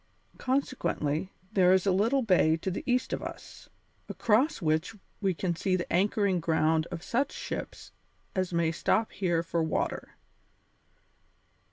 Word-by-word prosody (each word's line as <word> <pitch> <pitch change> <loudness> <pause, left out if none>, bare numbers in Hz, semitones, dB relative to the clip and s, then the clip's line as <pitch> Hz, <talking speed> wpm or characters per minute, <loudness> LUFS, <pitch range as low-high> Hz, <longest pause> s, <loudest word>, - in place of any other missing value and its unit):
Consequently, 190 - -1 0.2
there 185 -2 +5
is 190 0 +3
a 195 - +3
little 230 +8 +2
bay 175 -6 +4
to 185 +3 -3
the 180 - -3
east 250 0 +1
of - - -2
us, - - -9 0.4
across 260 +8 +2
which 160 +5 0 0.3
we 190 -3 +1
can 175 0 -1
see 185 +2 0
the 175 -3 -3
anchoring 195 0 +2
ground 160 0 +1
of 175 -2 -6
such 270 +4 0
ships - - -6 0.4
as 185 -1 0
may 170 -1 +1
stop 215 +6 +1
here 175 -4 0
for 170 0 -1
water. 160 -1 -2
185 Hz, 145 wpm, -29 LUFS, 165-210 Hz, 0.4 s, there